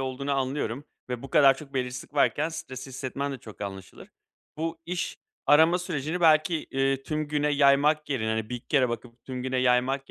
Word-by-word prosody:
olduğunu 135 +2 -3
anlıyorum 135 -1 -2 0.2
ve 125 -1 -4
bu 135 - -9
kadar 135 -3 +6
çok 140 -2 -12
belirsizlik 125 +2 -4
varken 145 +2 +2
stresli 135 -5 -7
hissetmen 140 +2 -4
de 135 - -6
çok 110 -2 -13
anlaşılır. 95 -2 -8 0.5
Bu 165 +1 -3
iş 180 0 -3 0.3
arama 160 +4 +6
sürecini 170 -1 -3
belki, 160 0 +5 0.2
eee, 135 0 0
tüm 155 +1 -3
güne 150 0 +1
yaymak 145 +2 +4
yerine, 110 -5 0
hani, 110 -1 -1
1-2 125 -1 -6
kere 135 -4 +3
bakıp 120 0 -7
tüm 130 -1 -5
güne 130 0 -2
yaymak 130 +2 +1
135 Hz, 180 wpm, -27 LUFS, 125-150 Hz, 0.5 s, kadar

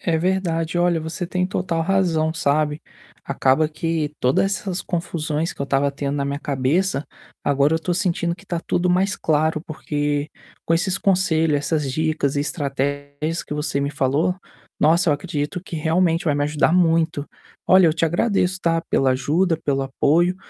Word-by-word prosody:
É 165 -2 0
verdade. 170 -2 -1
Olha, 175 -1 +2
você 160 +3 -4
tem 180 +1 -1
total 180 -2 -2
razão, 165 -4 +1
sabe, 150 0 0 0.4
acaba 135 +4 +2
que 155 -1 -2
toda 125 +7 +3
essas 195 -1 -2
confusões 165 -2 -2
que - - -19
eu - - 0
estava 140 +1 +1
tendo 140 0 -3
na 140 - -1
minha 140 0 -2
cabeça, 145 +3 0 0.4
agora 140 +1 +2
eu - - +3
estou 175 +2 -2
sentindo 175 -1 0
que 195 - -18
está 175 -4 -3
tudo 180 +1 0
mais 190 +3 +1
claro, 155 0 +1
porque 145 -1 -2 0.4
com 165 - +2
esses 180 +3 0
conselho, 165 -6 +2
essas 145 -1 -1
dicas 155 -1 0
e - - +1
estratégias 145 +2 -2
que - - -6
você 150 -1 -1
me 140 0 -1
falou, 150 +7 +1 0.4
nossa, 165 +3 +3
eu 150 - +4
acredito 150 +2 -4
que 170 - -7
realmente 165 +2 +1
vai 150 -4 +2
me 145 - 0
ajudar 150 +2 +1
muito. 165 -4 +2 0.4
Olha, 185 -1 +6
eu 160 - +4
te 165 - +1
agradeço, 185 +2 +1
tá, 165 -1 +1
pela 135 -1 +3
ajuda, 160 +7 +1
pelo 135 -1 +1
apoio, 160 +7 +2
160 Hz, 175 wpm, -22 LUFS, 145-175 Hz, 0.4 s, Olha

